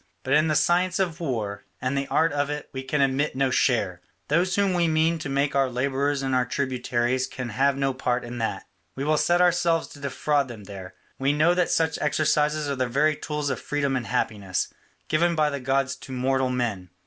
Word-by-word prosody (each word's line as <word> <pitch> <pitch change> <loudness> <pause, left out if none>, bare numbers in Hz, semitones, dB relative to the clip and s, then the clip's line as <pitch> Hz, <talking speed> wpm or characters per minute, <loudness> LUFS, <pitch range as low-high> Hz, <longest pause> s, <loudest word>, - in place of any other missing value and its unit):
But 130 - 0
in 155 +2 +4
the 155 - +1
science 175 +4 +2
of 175 -3 -1
war 110 -10 -3 0.2
and 130 +2 -1
the 140 0 -1
art 160 -2 +2
of 145 0 0
it 150 0 -5
we 130 - -4
can 135 +2 -1
admit 135 +2 +1
no 135 -1 +1
share; 105 -10 +1 0.3
those 180 +5 +2
whom 200 -2 +2
we 175 -1 +2
mean 160 +1 +2
to 145 - -5
make 140 +1 +1
our 135 -1 +3
labourers 135 +2 0
and 135 -1 -1
our 125 0 +3
tributaries 125 -1 -1
can 125 -2 -6
have 135 +4 +1
no 135 -1 0
part 125 -1 -1
in 120 0 -6
that; 110 - -2 0.3
we 135 - -3
will 155 +2 +2
set 175 +3 +3
ourselves 175 -2 +2
to 145 - -13
defraud 140 0 0
them 115 -4 -9
there; 95 -2 -9 0.2
we 135 +2 +2
know 155 +4 +4
that 180 -1 +1
such 160 -1 +1
exercises 150 0 +1
are 140 - -1
the 130 -1 0
very 150 +5 +2
tools 150 -2 -3
of - - -3
freedom 140 -2 -1
and 125 -3 -2
happiness, 105 -6 -1 0.3
given 170 +2 +2
by 155 -1 +2
the 140 - -3
gods 135 +1 0
to 135 - -11
mortal 130 +1 +1
men. 115 -8 -2
140 Hz, 215 wpm, -25 LUFS, 130-155 Hz, 0.3 s, in